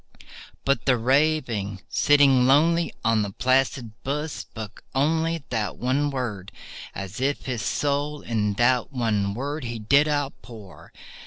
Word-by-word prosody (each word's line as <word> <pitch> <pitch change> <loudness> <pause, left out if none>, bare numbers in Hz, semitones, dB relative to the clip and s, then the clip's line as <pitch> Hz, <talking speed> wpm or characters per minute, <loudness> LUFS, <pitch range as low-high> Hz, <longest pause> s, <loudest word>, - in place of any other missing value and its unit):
But 135 -4 +1
the 130 -2 +4
Raven, 125 -6 +1
sitting 140 -3 +4
lonely 165 +5 +3
on 115 -1 +3
that 100 -2 -5
placid 130 -2 +1
bust, 150 +3 -2
spoke 110 -2 -9
only 160 +3 +1
That 110 -3 -2
one 135 +4 0
word, 115 -8 -4 0.4
as 100 +5 -6
if 140 +2 -1
his 125 -4 -3
soul 145 +5 -1
in 105 -3 -1
that 125 +3 +2
one 105 -6 0
word 145 +4 -4
he 120 0 -4
did 140 +8 +3
outpour. 130 - -5
130 Hz, 135 wpm, -24 LUFS, 110-145 Hz, 0.4 s, the